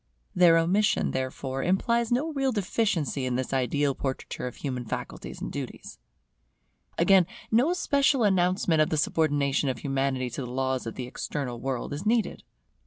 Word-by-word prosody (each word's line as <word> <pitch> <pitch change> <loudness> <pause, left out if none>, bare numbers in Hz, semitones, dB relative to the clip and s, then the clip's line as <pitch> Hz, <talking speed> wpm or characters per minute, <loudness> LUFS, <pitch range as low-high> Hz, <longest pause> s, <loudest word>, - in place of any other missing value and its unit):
Their 170 -2 +6
omission, 185 +6 +2
therefore, 130 +1 -3
implies 235 - +1
no 295 +7 0
real 270 -2 +1
deficiency 195 - 0
in 125 - -1
this 130 +1 -2
ideal 135 +2 +1
portraiture 130 -1 -4
of 125 - -7
human 130 -4 -4
faculties 115 - -6
and - - -4
duties. - - -7 1.0
Again, 180 0 +5 0.2
no 245 +9 +4
special 280 -7 +2
announcement 180 -4 +2
of 155 - +2
the 155 - 0
subordination 145 -2 +1
of 130 - -2
Humanity 135 -2 -1
to 120 - -5
the 125 - -5
laws 130 -1 -1
of 115 - -5
the 125 - -4
External 125 -1 -4
World 135 +1 -3
is 145 +5 -5
needed. 225 +1 +1
150 Hz, 160 wpm, -27 LUFS, 130-200 Hz, 1.0 s, Their